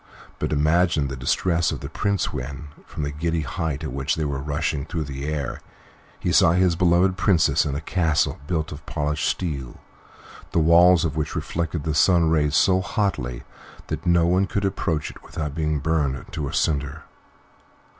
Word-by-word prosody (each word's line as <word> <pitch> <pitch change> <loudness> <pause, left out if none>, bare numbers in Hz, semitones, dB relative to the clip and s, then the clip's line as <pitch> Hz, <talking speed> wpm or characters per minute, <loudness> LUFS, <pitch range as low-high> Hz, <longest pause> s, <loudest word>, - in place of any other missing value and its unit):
But - - -2
imagine 75 -1 +2
the 65 - -4
distress 85 +6 +1
of - - -5
the 70 - -5
Prince 100 +6 -1
when, 70 +2 -6 0.2
from 75 - -5
the 70 - -2
giddy 80 +2 -1
height 75 +1 -3
at 75 - -4
which 70 +1 -1
they 80 - -2
were 70 -2 -2
rushing 75 0 -2
through 80 +1 -3
the 70 0 -6
air, 75 -4 -3 0.6
he - - -1
saw 80 - +5
his 90 -1 +3
beloved 90 +2 +3
Princess 80 -6 +3
in 70 - -2
a 70 - -3
castle 80 -2 0
built 80 -3 -2
of 75 +1 -8
polished 75 -1 -1
steel, 70 -9 -4 0.7
the - - 0
walls 85 +2 +6
of 75 - -2
which 75 -1 -2
reflected 85 -2 -3
the 80 - -1
sun's 80 +3 +4
rays 75 -2 +2
so 95 +3 +4
hotly 90 - -2 0.5
that 80 +3 -4
no 85 -1 +4
one 90 +3 +2
could 100 0 -1
approach 85 -5 -1
it - - -15
without 75 -3 -5
being 75 -1 -1
burnt 75 -3 -1
to 80 -4 -3
a - - -5
cinder! 70 -1 -1
80 Hz, 180 wpm, -23 LUFS, 70-85 Hz, 0.7 s, walls